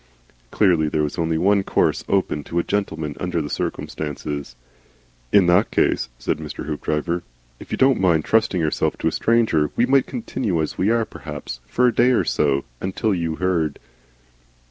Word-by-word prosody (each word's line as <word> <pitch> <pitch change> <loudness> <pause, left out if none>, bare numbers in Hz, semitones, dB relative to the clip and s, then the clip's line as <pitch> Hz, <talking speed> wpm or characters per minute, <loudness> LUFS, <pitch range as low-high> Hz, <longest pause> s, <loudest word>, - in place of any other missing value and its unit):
Clearly 85 - +3
there 75 0 0
was 75 +3 -3
only 80 -1 0
one 100 +4 +3
course - - +1
open 95 -6 0
to 85 - -5
a 85 - +2
gentleman 80 -8 -2
under 90 -2 -1
the 75 -2 -4
circumstances. 75 -4 -4 0.8
"In 100 -3 +6
that 90 +5 +4
case," - - +1
said - - -2
Mr. 75 -3 -6
Hoopdriver, 75 +3 -2 0.4
"if - - -12
you - - -1
don't 130 -5 +3
mind 85 -4 +3
trusting 110 -4 +2
yourself 75 -2 0
to - - -1
a - - +2
stranger, 110 -11 +2
we 120 - +3
might 135 +1 +3
continue 115 - -2
as 80 - -2
we 95 - +1
are 115 0 +2
perhaps. 75 - -8
For 125 - +2
a 125 - +3
day 120 +3 +4
or - - +3
so. 70 -2 +1 0.2
Until 100 +3 -1
you 85 -3 -2
heard." 85 -4 0
85 Hz, 175 wpm, -22 LUFS, 75-100 Hz, 0.8 s, In